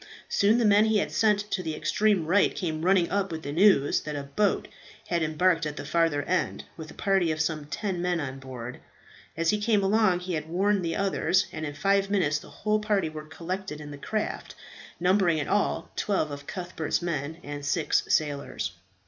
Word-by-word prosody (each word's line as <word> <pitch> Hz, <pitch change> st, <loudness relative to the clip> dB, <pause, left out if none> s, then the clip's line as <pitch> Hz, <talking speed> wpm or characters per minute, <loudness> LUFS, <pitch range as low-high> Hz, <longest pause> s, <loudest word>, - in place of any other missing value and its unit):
Soon 210 Hz, +3 st, +3 dB
the 240 Hz, -, +2 dB
man 210 Hz, +1 st, +5 dB
he 220 Hz, -1 st, +3 dB
had 200 Hz, -, -1 dB
sent 210 Hz, -2 st, +3 dB
to 185 Hz, -, 0 dB
the 160 Hz, -3 st, -3 dB
extreme 195 Hz, +3 st, +1 dB
right 190 Hz, +5 st, +3 dB
came 160 Hz, -4 st, -3 dB
running 185 Hz, -1 st, +3 dB
up 195 Hz, -2 st, 0 dB
with 160 Hz, -1 st, -5 dB
the 140 Hz, -, -4 dB
news 165 Hz, -4 st, +4 dB
that 150 Hz, -1 st, -5 dB
a 140 Hz, -, -3 dB
boat 190 Hz, +9 st, 0 dB, 0.4 s
had 170 Hz, -1 st, +1 dB
embarked 165 Hz, +2 st, +2 dB
at 150 Hz, -, -5 dB
the -, -, -5 dB
farther 155 Hz, -2 st, +1 dB
end, 180 Hz, +4 st, -1 dB
with 160 Hz, -2 st, -9 dB
a -, -, -12 dB
party 190 Hz, -4 st, +2 dB
of 155 Hz, -, -3 dB
some 155 Hz, -2 st, -1 dB
ten 190 Hz, +1 st, -3 dB
men 180 Hz, -1 st, 0 dB
on 135 Hz, -3 st, -5 dB
board. 125 Hz, -2 st, -8 dB, 0.6 s
As 165 Hz, 0 st, +2 dB
he 210 Hz, 0 st, -1 dB
came 210 Hz, -2 st, +2 dB
along 195 Hz, -3 st, +3 dB
he 180 Hz, 0 st, -4 dB
had 155 Hz, -1 st, -3 dB
warned 195 Hz, +3 st, +1 dB
the 165 Hz, -1 st, -1 dB
others, 190 Hz, -2 st, +1 dB
and 155 Hz, 0 st, -4 dB
in 145 Hz, -, -6 dB
five 195 Hz, +5 st, +2 dB
minutes 165 Hz, -7 st, +1 dB
the -, -, -14 dB
whole 210 Hz, +9 st, 0 dB
party 205 Hz, -5 st, 0 dB
were 155 Hz, -1 st, -8 dB
collected 170 Hz, 0 st, -5 dB
in 145 Hz, -1 st, -8 dB
the 145 Hz, -, -8 dB
craft, 215 Hz, +7 st, -3 dB, 0.4 s
numbering 180 Hz, -2 st, +3 dB
in 145 Hz, -, -2 dB
all 205 Hz, 0 st, 0 dB
twelve 190 Hz, -8 st, 0 dB
of 145 Hz, 0 st, -8 dB
Cuthbert's 175 Hz, -3 st, -3 dB
men 160 Hz, -2 st, -3 dB
and 145 Hz, 0 st, -6 dB
six 150 Hz, +2 st, +1 dB
sailors. 145 Hz, -10 st, -1 dB
170 Hz, 205 wpm, -27 LUFS, 150-195 Hz, 0.6 s, man